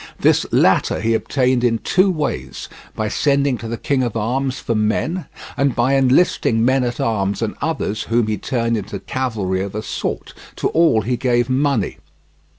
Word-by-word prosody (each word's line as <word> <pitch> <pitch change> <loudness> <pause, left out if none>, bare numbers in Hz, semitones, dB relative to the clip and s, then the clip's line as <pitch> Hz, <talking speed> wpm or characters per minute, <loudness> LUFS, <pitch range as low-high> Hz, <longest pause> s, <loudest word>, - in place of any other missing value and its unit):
This - - +3
latter - - +3
he 115 +1 +1
obtained 125 +2 +1
in 115 -2 +2
two 185 - +2
ways, 135 - -3 0.3
by 110 - -1
sending 140 +3 +1
to 115 - -6
the 115 +1 -4
King 135 +3 0
of 120 -4 -1
France 130 +4 -1
for 115 - -2
men 115 +11 -1 0.3
and 140 -3 +1
by 120 +3 +2
enlisting 130 -4 +3
men 130 +1 +3
at 120 -1 -3
arms 100 -3 0
and 110 - -2
others 140 -9 -2
whom 115 0 +1
he 110 0 -2
turned 115 -3 -1
into 100 0 -5
cavalry 100 -5 -2
of 100 +1 -5
a 110 - -3
sort: - - -4 0.2
to - - -1
all 160 -9 +3
he 125 +2 -1
gave 120 0 +1
money. 135 -5 0
120 Hz, 175 wpm, -19 LUFS, 110-135 Hz, 0.3 s, This